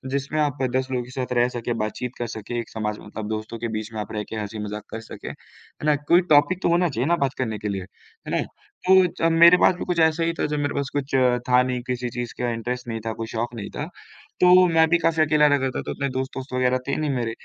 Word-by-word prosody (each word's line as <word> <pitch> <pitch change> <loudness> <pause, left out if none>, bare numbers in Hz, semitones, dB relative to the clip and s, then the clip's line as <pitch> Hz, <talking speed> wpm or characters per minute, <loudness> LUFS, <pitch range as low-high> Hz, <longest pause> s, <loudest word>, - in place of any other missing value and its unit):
जिसमें 140 +3 -2
आप 145 -2 -1
10 130 0 +1
लोगों 125 -1 -1
के 125 - -13
साथ 130 -1 -3
रह 120 0 +4
सके, 120 -1 -3
बात-चीत 115 +3 -4
कर 120 - -3
सके, 115 +1 -5
एक 115 - -6
समाज 105 -1 -3
मतलब 105 +1 -7
दोस्तों 110 +1 -4
के 120 - -2
बीच 110 +1 -6
में 110 - -4
आप 105 - -7
रह 105 -1 -2
के - - -5
हँसी-मजाक 105 0 -5
कर 110 - -4
सके, 115 - -10
है - - -6 0.5
ना? 150 -1 +4
कोई 150 +5 +3
टॉपिक 175 +6 +4
तो - - +2
होना 175 +1 +3
चाहिए 130 -1 -1
ना 170 - +4
बात 135 - -3
करने 110 -4 -2
के 105 - -4
लिए, 100 -1 -3 0.5
है - - -4
ना? - - +1 0.5
तो 190 0 +7
ज 165 -1 0
मेरे 170 +2 +8
पास 180 - +4
भी 180 - -5
कुछ 175 -2 -1
ऐसा 160 0 +3
ही 165 0 0
था - - +1
जब 150 0 -2
मेरे 145 0 -1
पास 140 -1 -1
कुछ 140 -1 -3 0.4
था 125 0 +6
नहीं, 125 -1 -2
किसी 125 -1 -2
चीज़ 120 0 -5
का 125 - 0
इंटरेस्ट 120 +2 -4
नहीं 115 -1 -3
था, 115 - -2
कोई 115 0 -5
शौक 115 +2 -3
नहीं 100 -3 -6
था, 145 - -3 0.6
तो 180 0 +7
मैं 165 -1 +4
भी 170 - +5
काफ़ी 165 -1 +2
अकेला 150 0 +4
रहता 140 -2 +2
था, - - -2
तो - - -5
इतने 140 - -2
दोस्त-वोस्त 130 0 -5
वगैरह 125 0 +2
थे 140 - 0
नहीं 155 -1 -1
मेरे। 120 -4 -1
130 Hz, 265 wpm, -24 LUFS, 115-155 Hz, 0.6 s, मेरे